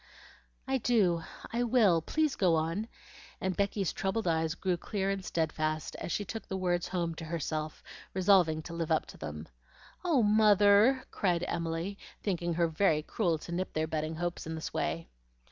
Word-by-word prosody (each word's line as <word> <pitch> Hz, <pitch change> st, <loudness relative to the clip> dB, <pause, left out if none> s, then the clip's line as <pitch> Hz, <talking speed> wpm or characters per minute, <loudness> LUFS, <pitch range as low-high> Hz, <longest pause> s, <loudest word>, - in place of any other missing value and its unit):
"I 265 Hz, 0 st, +1 dB
do! 200 Hz, -8 st, +3 dB, 0.3 s
I 235 Hz, -, +1 dB
will! 220 Hz, -8 st, +4 dB
please 310 Hz, -, 0 dB
go 180 Hz, -4 st, +3 dB
on," 165 Hz, +7 st, -1 dB, 0.5 s
and 190 Hz, -1 st, -1 dB
Becky's 200 Hz, -2 st, 0 dB
troubled 195 Hz, +2 st, -1 dB
eyes 160 Hz, 0 st, +1 dB
grew 185 Hz, 0 st, 0 dB
clear 195 Hz, +2 st, -2 dB
and 195 Hz, -1 st, -3 dB
steadfast 155 Hz, -2 st, -1 dB
as -, -, -5 dB
she 205 Hz, -, -1 dB
took 225 Hz, +4 st, -6 dB
the 190 Hz, -, -3 dB
words 175 Hz, -2 st, 0 dB
home 170 Hz, -3 st, -1 dB
to 160 Hz, -, -7 dB
herself, 155 Hz, -1 st, -3 dB, 0.3 s
resolving 180 Hz, -5 st, +4 dB
to 170 Hz, -, -8 dB
live 165 Hz, -1 st, -3 dB
up 160 Hz, -, +2 dB
to -, -, -12 dB
them. 75 Hz, +2 st, -6 dB, 0.6 s
"Oh, 315 Hz, -9 st, +3 dB
mother!" 210 Hz, +4 st, +5 dB
cried 180 Hz, -3 st, 0 dB
Emily, 170 Hz, +4 st, -3 dB, 0.2 s
thinking 175 Hz, -4 st, -1 dB
her 170 Hz, 0 st, +3 dB
very 160 Hz, -2 st, +2 dB
cruel 170 Hz, -2 st, 0 dB
to 160 Hz, -, -9 dB
nip 185 Hz, +2 st, -2 dB
their 155 Hz, 0 st, 0 dB
budding 155 Hz, 0 st, -2 dB
hopes 175 Hz, 0 st, -3 dB
in 160 Hz, -, -3 dB
this 160 Hz, -, -5 dB
way. 80 Hz, 0 st, -2 dB
175 Hz, 175 wpm, -31 LUFS, 160-200 Hz, 0.6 s, mother